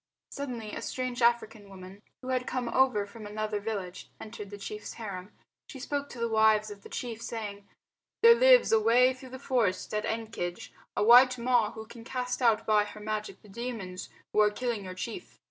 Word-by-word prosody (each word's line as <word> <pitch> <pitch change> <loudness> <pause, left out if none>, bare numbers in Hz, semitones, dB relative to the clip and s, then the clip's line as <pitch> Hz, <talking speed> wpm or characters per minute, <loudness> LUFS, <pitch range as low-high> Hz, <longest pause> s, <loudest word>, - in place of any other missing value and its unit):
Suddenly 245 -7 -5
a - - -5
strange 255 -1 -4
African 235 -3 +1
woman, 190 +1 -12 0.2
who 255 - -6
had 255 -1 -1
come 250 -1 -2
over 255 -6 +2
from 210 +1 -10
another 210 0 -3
village, 200 -4 -5
entered 210 -2 -8
the 205 - -8
chief's 210 +1 -7
harem. 200 -3 -7 0.4
She 275 - -10
spoke 285 +2 -3
to 245 - -10
the 235 - 0
wives 220 -1 +3
of 200 -1 -10
the - - -13
chief, 230 -2 -5
saying, 205 -4 -6 0.6
"There 465 0 +10
lives - - +6
away 230 +4 +5
through 255 0 -12
the 260 - -8
forest 230 -10 -1
at 210 0 -1
Ekenge 220 -6 -4 0.3
a - - +2
white 250 +3 +7
Ma 240 -2 +2
who 220 0 -8
can 230 +1 -12
cast 250 +1 -3
out 230 -3 +3
by 210 -1 +3
her 205 0 -10
magic 210 -2 -5
the - - -16
demons 205 -5 -6 0.2
who - - +2
are 210 0 +6
killing 225 -2 -3
your 185 0 -7
chief. 220 +4 -7
220 Hz, 195 wpm, -29 LUFS, 205-250 Hz, 0.6 s, There